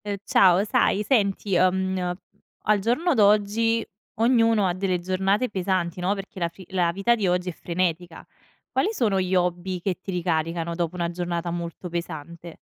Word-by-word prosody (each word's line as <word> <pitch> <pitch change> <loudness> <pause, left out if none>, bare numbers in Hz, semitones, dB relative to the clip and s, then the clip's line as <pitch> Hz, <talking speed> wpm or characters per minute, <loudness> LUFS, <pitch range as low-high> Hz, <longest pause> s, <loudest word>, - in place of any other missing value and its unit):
Uhm, 205 -1 -2
ciao. 185 0 +5
Sai 210 -1 +2
senti, 200 -5 +1
uhm, 190 +1 +2
n 180 -1 -2 0.5
al 210 -1 +3
giorno 250 - +1
d'oggi, 215 +1 +3 0.3
ognuno 230 -2 +3
ha 175 - 0
delle 185 -1 -1
giornate 190 +6 0
pesanti, 185 -3 -1
no, 185 +3 0
perché 195 0 -8
la 170 -1 0
fi 185 +2 -14
la 180 -3 +1
vita 195 +6 +2
di 215 -5 0
oggi 180 0 0
è - - -3
frenetica. 175 0 -3 0.5
Quali 430 - +1
sono 210 - +1
gli 185 0 -1
hobby 180 +1 -1
che 180 0 -2
ti - - -10
ricaricano, 170 -1 -1
dopo 170 0 -2
una 170 -1 -2
giornata 175 -1 -3
molto 170 +1 -5
pesante? 170 0 -7
185 Hz, 170 wpm, -24 LUFS, 175-205 Hz, 0.5 s, ciao